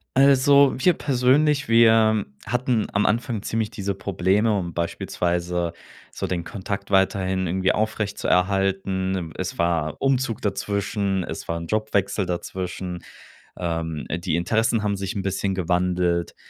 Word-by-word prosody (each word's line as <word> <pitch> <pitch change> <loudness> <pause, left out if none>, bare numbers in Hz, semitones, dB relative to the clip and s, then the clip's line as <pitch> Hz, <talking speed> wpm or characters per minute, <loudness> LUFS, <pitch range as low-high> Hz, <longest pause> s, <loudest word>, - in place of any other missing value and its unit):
Also 140 +1 +5
wir 180 +7 +4
persönlich, 140 0 +2
wir 110 -2 +5 0.2
hatten 125 -1 0
am 100 - +1
Anfang 115 -1 0
ziemlich 110 -1 -1
diese 100 -2 -3
Probleme, 100 +3 +1
um 85 -2 -5
beispielsweise 85 +1 -2 0.4
so - - -4
den 85 -2 -2
Kontakt 100 +1 -5
weiterhin 95 -1 +1
irgendwie 95 +2 +1
aufrechtzuerhalten. 95 -2 0
Im 85 -4 -5
es - - -4
war 85 -3 0
Umzug 130 -4 0
dazwischen, 100 -1 -1
es - - -7
war 85 - -2
'n 85 - -7
Jobwechsel 100 -2 0
dazwischen, 90 0 -5 0.5
ähm, 80 -3 -3
die 85 -1 -1
Interessen 110 +5 +1
haben 100 -1 +1
sich 95 0 -4
'n 100 - -1
bisschen 95 0 -1
gewandelt. 90 -1 0
95 Hz, 130 wpm, -23 LUFS, 90-110 Hz, 0.5 s, Also